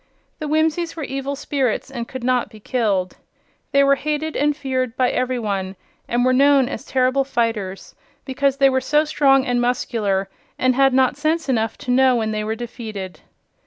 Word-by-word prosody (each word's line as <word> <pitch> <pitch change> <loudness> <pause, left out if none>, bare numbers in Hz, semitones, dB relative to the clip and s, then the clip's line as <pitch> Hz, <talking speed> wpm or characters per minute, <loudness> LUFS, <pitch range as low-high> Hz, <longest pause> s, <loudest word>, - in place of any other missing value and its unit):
The 305 - -4
Whimsies 315 +2 0
were 320 - -5
evil 275 +1 -4
spirits 275 -2 -2
and 235 -3 -5
could 260 -2 -7
not 250 -2 +1
be 215 -1 -14
killed. 205 -6 -1 0.5
They 280 -1 +4
were 275 0 +5
hated 305 +2 -2
and 295 0 +1
feared 255 -4 -2
by 255 -1 +2
every 255 0 -1
one 195 -4 -3 0.3
and 245 +1 +1
were 255 - +3
known 275 0 +4
as 255 -2 -6
terrible 260 +1 +1
fighters 225 -7 -2 0.3
because 275 0 0
they 275 0 +5
were 260 0 +1
so 300 +3 +2
strong 270 -3 +3
and 245 -1 0
muscular 215 -5 0 0.3
and 255 0 +2
had 270 0 +3
not 260 0 +3
sense 315 +2 0
enough 225 -4 0
to 250 - -4
know 260 0 +4
when 220 -2 -1
they 215 0 -2
were 220 +1 -2
defeated. 215 -7 -7
255 Hz, 185 wpm, -21 LUFS, 230-275 Hz, 0.5 s, were